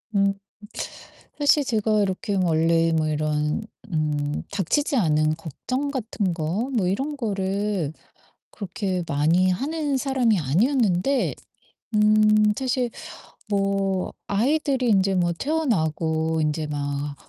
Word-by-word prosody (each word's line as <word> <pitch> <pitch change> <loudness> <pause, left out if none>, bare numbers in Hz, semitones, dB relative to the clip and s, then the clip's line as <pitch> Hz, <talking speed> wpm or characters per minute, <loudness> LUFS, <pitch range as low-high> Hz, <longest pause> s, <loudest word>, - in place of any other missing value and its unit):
음. 195 0 +3 1.1
사실 290 0 +4
제가 215 -2 +1
이렇게 200 +1 -1
원래 165 -2 +2
뭐 160 -1 +1
이런 150 +3 -1 0.3
음 150 -2 -1
닥치지 265 - 0
않은 155 -6 +2
걱정 255 - -4
같은 225 -7 -2
거 175 - -2
뭐 210 -7 +1
이런 270 +11 -1
거를 200 - -1 0.6
그렇게 190 -3 -3
많이 165 +6 +2
하는 290 - -1
사람이 260 -5 +2
아니었는데 210 - +1 0.6
음 215 0 +4
사실 255 -2 0 0.6
뭐 195 -2 0
아이들이 265 +4 +1
인제 195 -2 +3
뭐 175 -1 +2
태어나고 160 - 0
인제 155 0 -1
막 145 0 -3
195 Hz, 215 characters per minute, -24 LUFS, 160-235 Hz, 1.1 s, 사실